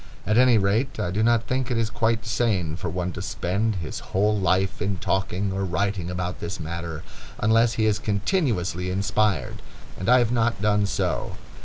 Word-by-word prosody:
At 105 Hz, -, +1 dB
any 125 Hz, -1 st, +6 dB
rate, 110 Hz, +6 st, 0 dB
I 100 Hz, -5 st, -1 dB
do 100 Hz, +4 st, 0 dB
not 115 Hz, 0 st, +3 dB
think 130 Hz, 0 st, -1 dB
it 120 Hz, -, 0 dB
is 115 Hz, -1 st, 0 dB
quite 115 Hz, 0 st, 0 dB
sane 105 Hz, -8 st, 0 dB
for 85 Hz, +1 st, -4 dB
one 90 Hz, +1 st, -2 dB
to -, -, -7 dB
spend 100 Hz, +5 st, -1 dB
his 85 Hz, -4 st, -5 dB
whole 105 Hz, +3 st, 0 dB
life 95 Hz, 0 st, +1 dB
in 100 Hz, -2 st, -1 dB
talking 95 Hz, +1 st, -1 dB
or 100 Hz, 0 st, -1 dB
writing 95 Hz, 0 st, -1 dB
about 90 Hz, 0 st, -3 dB
this 85 Hz, +4 st, -5 dB
matter, 85 Hz, 0 st, -5 dB, 0.3 s
unless 115 Hz, +2 st, +3 dB
he 110 Hz, -, +1 dB
is 105 Hz, -1 st, +2 dB
continuously 100 Hz, -, -1 dB
inspired, 100 Hz, -, 0 dB, 0.4 s
and 95 Hz, -, -2 dB
I 125 Hz, -, +7 dB
have 120 Hz, -2 st, +2 dB
not 115 Hz, -3 st, +1 dB
done 105 Hz, 0 st, +2 dB
so. -, -, -2 dB
100 Hz, 185 wpm, -24 LUFS, 90-115 Hz, 0.4 s, I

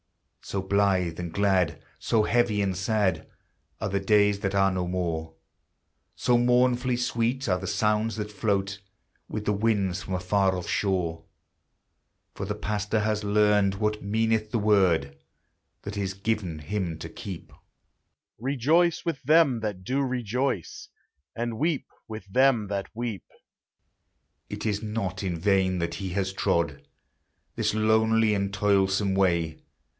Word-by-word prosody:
So 100 Hz, -1 st, -4 dB
blithe 95 Hz, -4 st, +1 dB
and 85 Hz, -2 st, -4 dB
glad, 95 Hz, -2 st, +1 dB, 0.2 s
so 110 Hz, -2 st, +2 dB
heavy 115 Hz, -3 st, +2 dB
and 95 Hz, -2 st, -1 dB
sad, 95 Hz, -3 st, 0 dB, 0.5 s
Are -, -, -2 dB
the 100 Hz, 0 st, 0 dB
days 105 Hz, 0 st, +3 dB
that 100 Hz, 0 st, -2 dB
are 95 Hz, 0 st, +4 dB
no 90 Hz, -1 st, -2 dB
more, 85 Hz, -3 st, -3 dB, 0.8 s
So 120 Hz, -1 st, +2 dB
mournfully 125 Hz, 0 st, +2 dB
sweet 120 Hz, +2 st, -1 dB
are 90 Hz, -2 st, +1 dB
the 95 Hz, -, -6 dB
sounds 110 Hz, +1 st, +1 dB
that 105 Hz, -1 st, -4 dB
float 100 Hz, -1 st, -1 dB, 0.5 s
With 105 Hz, -1 st, -4 dB
the 105 Hz, -, +2 dB
winds 100 Hz, -4 st, 0 dB
from 95 Hz, -, -4 dB
a -, -, -1 dB
far 95 Hz, +1 st, +1 dB
off 90 Hz, -, -6 dB
shore. 85 Hz, -5 st, -1 dB, 1.1 s
For 95 Hz, -, -5 dB
the 105 Hz, -, -2 dB
pastor 105 Hz, +1 st, -1 dB
has 105 Hz, 0 st, 0 dB
learned 105 Hz, -1 st, +3 dB
what 105 Hz, +1 st, -1 dB
meaneth 110 Hz, +1 st, 0 dB
the 120 Hz, -, +1 dB
word 90 Hz, -10 st, +2 dB, 0.7 s
That 100 Hz, 0 st, -6 dB
is 100 Hz, -2 st, -2 dB
given 100 Hz, -5 st, -2 dB
him 85 Hz, +1 st, -3 dB
to -, -, -7 dB
keep, 95 Hz, -4 st, -8 dB, 0.9 s
"Rejoice 145 Hz, +9 st, +2 dB
with 165 Hz, -5 st, -2 dB
them 145 Hz, -3 st, +4 dB
that 105 Hz, -4 st, -4 dB
do 130 Hz, +8 st, 0 dB
rejoice, 125 Hz, -, -2 dB, 0.5 s
And 115 Hz, -1 st, -3 dB
weep 155 Hz, -1 st, 0 dB, 0.2 s
with 110 Hz, -4 st, -7 dB
them 120 Hz, +1 st, +3 dB
that 100 Hz, -1 st, -3 dB
weep." 115 Hz, -6 st, -4 dB, 1.3 s
It -, -, -6 dB
is 105 Hz, -1 st, 0 dB
not 105 Hz, -3 st, -3 dB
in 90 Hz, -4 st, -2 dB
vain 95 Hz, 0 st, +2 dB
that 85 Hz, -1 st, -2 dB
he 95 Hz, -1 st, -4 dB
has 95 Hz, +1 st, -2 dB
trod 85 Hz, -7 st, 0 dB, 0.7 s
This -, -, 0 dB
lonely 110 Hz, 0 st, +3 dB
and 100 Hz, -1 st, -1 dB
toilsome 100 Hz, 0 st, +2 dB
way. 85 Hz, -5 st, +1 dB
100 Hz, 145 wpm, -26 LUFS, 95-110 Hz, 1.3 s, are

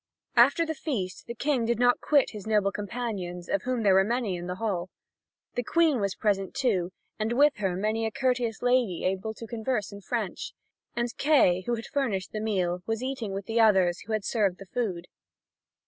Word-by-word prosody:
After 270 Hz, +8 st, +5 dB
the 320 Hz, -, -2 dB
feast 215 Hz, -, -4 dB
the 235 Hz, -, -5 dB
King 275 Hz, -1 st, 0 dB
did 235 Hz, 0 st, +1 dB
not 245 Hz, +1 st, +3 dB
quit 285 Hz, -3 st, +3 dB
his 210 Hz, -2 st, -8 dB
noble 210 Hz, -2 st, +2 dB
companions, 200 Hz, -5 st, -4 dB
of 200 Hz, -, 0 dB
whom 250 Hz, -1 st, -1 dB
there 200 Hz, -2 st, +5 dB
were 190 Hz, 0 st, +6 dB
many 230 Hz, -2 st, -1 dB
in 175 Hz, 0 st, -6 dB
the 180 Hz, -, -3 dB
hall. 185 Hz, -4 st, -2 dB, 0.6 s
The -, -, -1 dB
Queen 320 Hz, 0 st, +3 dB
was 200 Hz, -1 st, -1 dB
present, 200 Hz, 0 st, 0 dB
too, 205 Hz, -10 st, +1 dB, 0.3 s
and 220 Hz, +2 st, 0 dB
with 290 Hz, +4 st, +4 dB
her 195 Hz, -3 st, -1 dB
many 215 Hz, +4 st, 0 dB
a -, -, -4 dB
courteous 245 Hz, -2 st, -1 dB
lady 245 Hz, -7 st, +2 dB
able 190 Hz, +4 st, -1 dB
to 230 Hz, -, -8 dB
converse 225 Hz, -2 st, -2 dB
in 200 Hz, 0 st, -9 dB
French. -, -, -3 dB, 0.4 s
And 240 Hz, 0 st, -2 dB
Kay, 275 Hz, -, +4 dB
who 240 Hz, -, +1 dB
had 230 Hz, -, -7 dB
furnished 220 Hz, -10 st, -2 dB
the 215 Hz, -, -4 dB
meal, 180 Hz, -5 st, 0 dB
was 225 Hz, +2 st, -2 dB
eating 255 Hz, -6 st, -3 dB
with 195 Hz, 0 st, -4 dB
the 225 Hz, +2 st, 0 dB
others 190 Hz, -5 st, +4 dB
who 220 Hz, -, -6 dB
had 215 Hz, -2 st, -1 dB
served 200 Hz, -6 st, +1 dB
the 195 Hz, -, -10 dB
food. 185 Hz, -5 st, -3 dB
220 Hz, 200 wpm, -27 LUFS, 190-245 Hz, 0.6 s, were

